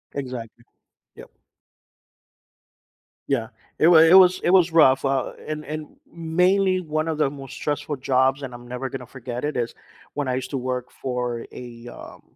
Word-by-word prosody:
Exactly, 120 -4 -6 0.5
yup. - - -13 2.0
Yeah, 120 -5 0 0.3
it 160 - +4
wa 170 -1 +7
it 165 +2 +7
was 185 -1 +7
it 175 - +2
was 180 -3 +5
rough, 135 -5 +5
uh, 135 -2 0
and 150 0 -5
and 155 0 -7
mainly 180 +3 +1
one 155 -2 -2
of 155 - -2
the 150 - +2
most 135 -2 -10
stressful 145 0 -3
jobs, 130 +1 +1
and 130 -3 -6
I'm 120 0 -11
never 125 +1 -4
gonna 125 - -7
forget 125 0 -7
it, 150 -2 -2
is 120 -1 -2 0.4
when 145 -3 -2
I 125 - 0
used 130 0 -4
to 135 - -2
work 125 -1 -3
for 125 -2 -4
a, 120 -1 -10
um - - -12
135 Hz, 170 wpm, -23 LUFS, 125-160 Hz, 2.0 s, wa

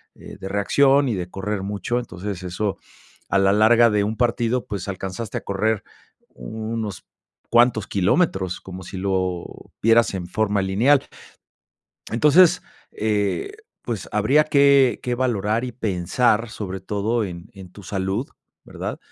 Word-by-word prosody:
eh, - - -12
de 95 - -6
reacción 135 +8 +3
y 115 - 0
de 90 -1 -4
correr 95 +1 -4
mucho, 100 +4 -2
entonces, 95 -4 -6
eso 95 +3 -2 0.5
a 100 - +2
la 95 0 +4
larga 115 +3 +5
de 105 -2 +1
un 110 +2 -3
partido, 120 0 0
pues, 100 -3 -5
alcanzaste 95 +3 -4
a - - -19
correr 105 +2 -1 0.5
unos 110 - -5 0.4
cuantos 120 -3 +3
kilómetros, 95 - 0
como 95 0 -9
si 95 - -8
lo 95 -2 -1 0.4
vieras 115 -1 +4
en 90 -2 -4
forma 105 +1 0
lineal, 115 +9 +3 1.1
entonces, 150 +9 +5 0.3
eh, 105 - -1 0.3
pues, 115 -6 -5
habría 110 +9 +4
que 140 -5 +4
que 125 - 0
valorar 115 -3 0
y 125 - -4
pensar, 110 +2 0
sobre 95 -4 -6
todo 105 +4 -1
en 90 0 -8
en 95 -2 -11
tu 100 +2 -14
salud, 95 +6 -2 0.4
¿verdad?, - - -6
105 Hz, 140 wpm, -22 LUFS, 95-120 Hz, 1.1 s, larga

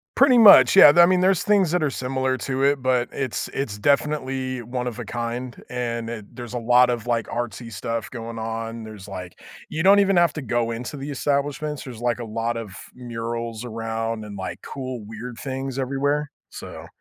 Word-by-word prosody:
Pretty 260 -2 +5
much, 210 -3 +8
yeah, 150 -6 +10
th 175 - +7
I - - +8
mean, 185 0 +3
there's 185 -1 +3
things 200 -5 +3
that 175 -2 +1
are 150 - +2
similar 130 0 -1
to 135 0 -2
it, 140 -2 +2
but 125 -2 +1
it's 130 -5 -3
it's 115 -7 -3
definitely 135 -1 0
one-of-a-kind, 120 0 -5
and 115 -2 -3
it 110 -1 -9
there's 120 -1 -8
a 120 - -2
lot 125 +1 +4
of, 120 -1 -3
like, 115 -2 0
artsy 115 -1 -5
stuff 115 +2 -4
going 115 -1 -7
on, 115 0 -5
there's 105 -2 -10
like 90 -2 -8 0.3
you 160 +1 -2
don't 200 +2 +6
even 195 -2 +3
have 170 -3 +3
to 150 - -5
go 120 -1 -1
into 125 +5 -5
the 140 +2 -6
establishments, 145 +1 -2
there's, 120 -3 -9
like, 120 0 0
a 120 - -5
lot 115 +1 -2
of 105 -5 -7 0.2
murals 115 -1 -5
around 115 -1 -4
and, 100 -1 -8
like, 95 - -6
cool 130 -3 -6
weird 115 +2 -8
things 135 -1 -4
everywhere, 140 +2 -1 0.2
so - - -9
125 Hz, 190 wpm, -23 LUFS, 115-140 Hz, 0.3 s, yeah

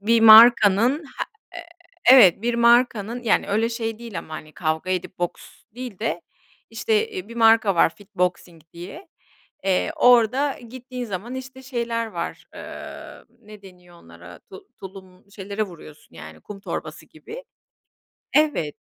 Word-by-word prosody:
Bir 230 +3 +2
markanın 225 - +6
he 275 - -6 0.4
eee - - -15 0.5
Evet 205 -7 +6
bir 240 0 -1
markanın 235 -1 +2
yani 220 -3 +1
öyle 220 +3 0
şey 225 -1 -5
değil 230 -7 -8
ama 155 - -9
hani 155 0 -10
kavga 160 +2 -3
edip 185 0 -4
boks 175 -1 -7
değil 245 -5 -8
de 225 - -3 0.5
işte, 445 0 -1
eee, 390 -4 -8
bir 235 - -11
marka 225 -3 +4
var 165 - +3
FitBoxing 180 -4 -4
diye, 195 - -11 0.6
eee, 190 +11 0
orada 250 +1 +3
gittiğin 250 +1 -8
zaman 215 +3 -6
işte 260 0 -9
şeyler 235 -3 -3
var, 170 -6 -7
ııı, - - -11
ne 210 -2 -15
deniyor 180 -2 -17
onlara, 85 +1 -14
tu 190 - -15
tulum, 190 0 -13
şeylere 200 +1 -5
vuruyorsun 160 - -11
yani 80 0 -12
kum 200 -1 -11
torbası - - -7
gibi - - -12 0.9
Evet, 295 - +1
220 Hz, 145 wpm, -22 LUFS, 185-245 Hz, 0.9 s, markanın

